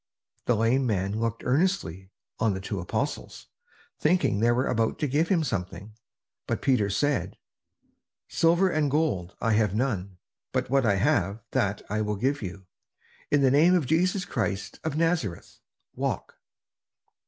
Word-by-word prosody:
The 120 - +3
lame 120 +4 +2
man 100 0 -1
looked 115 0 -2
earnestly 130 - 0 0.3
on 110 -3 +1
the - - -4
two 100 +1 -4
apostles, 90 - -4 0.5
thinking 155 - +2
they 115 +2 +3
were 125 +3 +1
about 115 -2 0
to 150 - -1
give 150 +5 +1
him 170 -3 +2
something. 95 - -4 0.5
But - - -2
Peter 125 -7 +2
said: 140 +8 0 0.9
"Silver 170 +3 +3
and 155 -3 +1
gold 130 - 0
have 110 -3 +2
I - - -3
none; 100 -7 -2 0.4
but - - -1
what 135 -3 +3
I 100 - +3
have 100 +2 +1
that 100 0 0
I 105 +2 -1
will 105 0 -1
give 135 +8 -1
you. 95 -1 -7 0.6
In 145 - +3
the 130 - +5
name 165 +6 +5
of 170 -6 +1
Jesus 180 +6 +1
Christ 105 -5 -3
of 155 -2 -2
Nazareth, 160 - -1 0.4
walk!" - - -3
115 Hz, 155 wpm, -27 LUFS, 100-150 Hz, 0.9 s, the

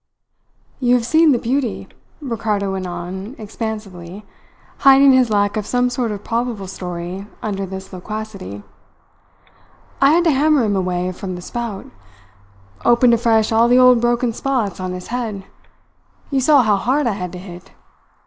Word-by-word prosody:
"You 245 -1 +3
have 240 -2 0
seen 315 +5 +4
the 255 - +3
beauty," 245 0 -2 0.3
Ricardo 215 -6 -2
went 190 -1 -4
on 185 +6 -6
expansively, 210 -3 -7 0.5
hiding 275 0 +7
his 255 -2 +4
lack 205 -1 +1
of 210 - -3
some 245 0 +1
sort 245 -2 -1
of 205 -1 -5
probable 230 -3 -2
story 180 +1 -6 0.2
under 195 -2 -3
this 190 +1 -8
loquacity. 195 - -7 1.4
"I 275 +2 +6
had 345 +1 +4
to 330 - +3
hammer 295 -1 +3
him 205 -2 0
away 180 -1 -1
from 185 0 -6
the 180 - -8
spout. 235 -4 -5 1.0
Opened 240 0 +4
afresh 225 -2 +2
all 225 +1 +4
the 245 +1 +4
old 250 -2 +6
broken 240 0 +1
spots 235 -8 -2
on 185 0 -4
his 180 0 -8
head. 225 -5 -4 0.9
You 270 -1 +1
saw 280 0 +5
how 210 -3 +2
hard 265 +8 0
I 235 - +2
had 180 -3 -5
to - - -6
hit. 180 -1 -11
220 Hz, 160 wpm, -19 LUFS, 190-245 Hz, 1.4 s, hiding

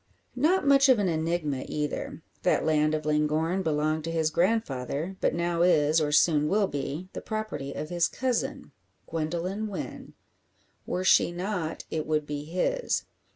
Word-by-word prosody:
Not 315 +9 +2
much 275 0 +5
of 255 - +6
an 205 -2 +1
enigma 160 -4 -1
either. 150 -1 -4 0.2
That - - +2
land 155 -1 +2
of 155 -1 -4
Llangorren 155 +4 +1
belonged 155 -1 0
to 165 - -3
his 160 -1 +1
grandfather, 170 - -1
but - - +1
now 170 0 0
is, 155 -3 +4
or 150 -1 0
soon 150 -1 +4
will 205 +4 +2
be, 145 +2 -4
the - - -5
property 215 -11 -4
of 150 +1 -5
his 175 -1 +2
cousin 255 -2 -2 0.3
Gwendoline 170 +6 -3
Wynn. 200 - -7 0.7
Were 180 - -1
she 185 - +5
not, 175 -2 -3
it 155 -1 -2
would 155 -1 0
be 145 0 -5
his. 185 - -1
165 Hz, 155 wpm, -27 LUFS, 150-190 Hz, 0.7 s, of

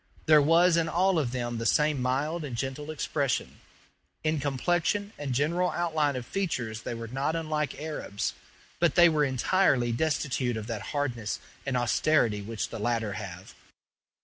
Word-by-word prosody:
There 155 -2 +7
was 165 +3 +5
in 165 0 +1
all 180 +2 +2
of 130 -6 -1
them 120 -2 -3
the 115 - -3
same 150 -3 +2
mild 145 +6 -1
and 135 -5 -5
gentle 135 +4 -4
expression. 140 -3 -2 0.6
In 155 -1 +1
complexion 175 - 0
and 145 -2 -4
general 165 +8 +1
outline 155 -5 0
of 125 -1 -4
features 120 - -2
they 120 - -4
were 115 0 -6
not 135 +7 -1
unlike 155 -3 -2
Arabs, 150 -9 -3 0.5
but 170 -3 +2
they 175 -1 +8
were 155 -2 +2
entirely 130 -1 +2
destitute 130 -3 0
of 110 - -5
that 110 -3 -4 0.2
hardness 120 -7 -2 0.3
and 130 -2 +1
austerity 120 -3 +2
which 110 +2 -4
the - - -6
latter 115 -1 -1
have. 95 -2 -8
140 Hz, 160 wpm, -28 LUFS, 120-160 Hz, 0.6 s, they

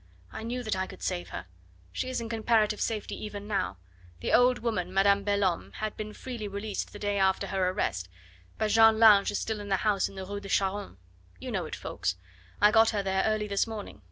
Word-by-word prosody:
I - - -6
knew 245 +2 -3
that 215 -3 -1
I 190 0 -2
could - - -11
save 180 -1 -2
her. - - -6 0.5
She 255 - -3
is 255 - -2
in 230 - -4
comparative 220 -2 +1
safety 215 -2 -2
even 205 -1 -6
now. 100 - -1 0.4
The - - -1
old 250 0 +5
woman, 185 -7 -2
Madame 200 +1 +3
Belhomme, 200 -4 0
had 215 -1 -4
been 215 0 -5
freely 235 -1 -6
released 200 +1 -4
the - - -9
day 205 -1 -1
after 190 0 +2
her 190 -2 0
arrest, 95 - -2 0.5
but 215 -1 0
Jeanne 225 0 +6
Lange 215 -3 +7
is 205 - -1
still 220 -1 -3
in 205 0 -7
the 195 - +3
house 205 -3 +2
in - - -14
the 190 0 -6
Rue 200 +1 -5
de 200 - -9
Charonne. 195 - -1 0.4
You - - -6
know - - -1
it, - - -5
Ffoulkes. 90 - -3 0.4
I 210 - +6
got 225 +1 +6
her 205 -3 -1
there 190 0 +1
early 215 -1 0
this 200 +2 +1
morning. 215 - -7
205 Hz, 220 wpm, -29 LUFS, 195-220 Hz, 0.5 s, Lange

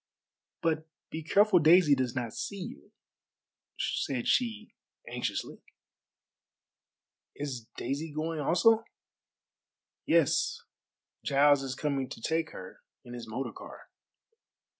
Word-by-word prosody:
"But 160 -1 0 0.2
be 160 - -4
careful 200 +4 +4
Daisy 160 -1 +6
does 130 -2 0
not 120 -3 -3
see 200 - -5
you," 185 - -8 0.9
said 130 -4 -1
she 225 -3 0 0.3
anxiously. - - -4 1.7
"Is 130 -6 -5
Daisy 140 +6 -3
going 155 +2 -3
also?" 220 +10 +4 1.2
"Yes. 485 -1 +2 0.6
Giles 145 0 +4
is 130 -2 -4
coming 135 -2 -1
to - - -8
take 160 +6 -1
her 95 0 -10 0.2
in 120 - -9
his 120 -1 -7
motor 130 +5 -3
car." - - -12
150 Hz, 105 wpm, -30 LUFS, 135-175 Hz, 1.7 s, Daisy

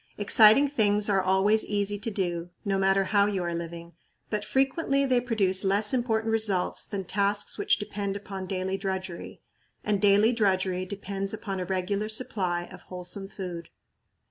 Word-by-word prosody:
Exciting 215 +6 +6
things 210 -6 +2
are 195 -1 +3
always 190 +4 +3
easy 205 0 -1
to 220 - -3
do, 175 -4 -3 0.2
no 195 -1 0
matter 195 0 +3
how 200 +1 +2
you 195 -3 -2
are 170 0 -3
living, 170 0 -7 0.4
but 210 -1 -1
frequently 275 +3 +1
they 255 -2 +2
produce 200 -6 +2
less 200 +3 +1
important 225 -3 0
results 215 -5 0
than 200 -2 -4
tasks 200 +2 0
which - - +3
depend 205 -1 -4
upon 195 -2 -7
daily 190 0 -2
drudgery; 190 -3 -5 0.4
and 205 -2 0
daily 205 +3 +5
drudgery 185 -4 0
depends 195 +1 -4
upon 195 -3 -5
a 180 - -3
regular 195 +3 -2
supply 190 -6 -2
of - - -11
wholesome 180 +2 -5
food. 180 -4 -7
200 Hz, 160 wpm, -27 LUFS, 185-215 Hz, 0.4 s, Exciting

